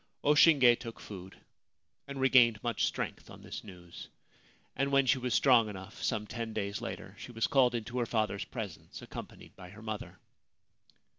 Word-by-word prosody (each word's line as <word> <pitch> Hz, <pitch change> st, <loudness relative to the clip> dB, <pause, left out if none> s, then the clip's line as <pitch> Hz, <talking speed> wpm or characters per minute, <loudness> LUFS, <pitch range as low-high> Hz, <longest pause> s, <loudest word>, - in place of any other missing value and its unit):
O 145 Hz, -, +5 dB
Shinge 140 Hz, -6 st, +6 dB
took 115 Hz, -2 st, -8 dB
food 95 Hz, -2 st, -10 dB, 0.7 s
and 140 Hz, -1 st, -6 dB
regained 125 Hz, -5 st, +5 dB
much 120 Hz, -1 st, 0 dB
strength -, -, -4 dB
on -, -, -12 dB
this -, -, -7 dB
news; 90 Hz, -4 st, -11 dB, 0.7 s
and 135 Hz, +1 st, 0 dB
when 135 Hz, -1 st, +4 dB
she 130 Hz, -, +3 dB
was 125 Hz, -1 st, -1 dB
strong 120 Hz, -5 st, +5 dB
enough, 95 Hz, -2 st, -9 dB
some 110 Hz, -3 st, -1 dB
ten 115 Hz, 0 st, -5 dB
days 100 Hz, -2 st, -3 dB
later, -, -, -6 dB
she -, -, -9 dB
was 115 Hz, -1 st, 0 dB
called 125 Hz, -3 st, +3 dB
into 120 Hz, +2 st, -3 dB
her 120 Hz, -, 0 dB
father's 105 Hz, -4 st, -1 dB
presence, -, -, -8 dB
accompanied -, -, -10 dB
by 90 Hz, -2 st, -11 dB
her 105 Hz, +3 st, -13 dB
mother. 110 Hz, -1 st, -6 dB
115 Hz, 170 wpm, -31 LUFS, 105-130 Hz, 0.7 s, Shinge